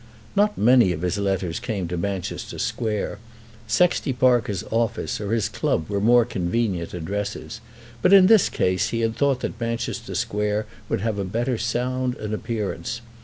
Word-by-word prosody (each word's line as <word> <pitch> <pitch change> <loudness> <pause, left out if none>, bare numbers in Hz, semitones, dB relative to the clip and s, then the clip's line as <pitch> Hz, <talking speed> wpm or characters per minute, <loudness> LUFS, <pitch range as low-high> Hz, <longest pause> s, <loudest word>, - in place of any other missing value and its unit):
Not 210 +1 +2
many 120 -3 +5
of 80 +1 -6
his 90 +3 0
letters 95 -4 -1
came 100 -6 -3
to 90 - -2
Manchester 95 +1 -4
Square. 105 -2 -2 0.5
Sexty 140 +3 +2
Parker's 120 -6 +2
office 115 -1 -1
or 105 0 -3
his 115 -3 +1
club 80 - -1
were 100 -1 -1
more 120 +2 +5
convenient 95 -4 -1
addresses; 105 +6 -4 0.4
but 180 - +4
in 195 -2 +9
this 215 -1 +6
case 90 0 +1
he 115 - -1
had 115 0 0
thought 140 -3 +1
that 115 - -5
Manchester 115 0 -3
Square 105 +1 -1 0.2
would - - 0
have 110 -2 -1
a - - 0
better 115 +5 -1
sound 125 +2 -1
and 105 0 -5
appearance. 110 +1 -3
110 Hz, 165 wpm, -23 LUFS, 100-120 Hz, 0.5 s, in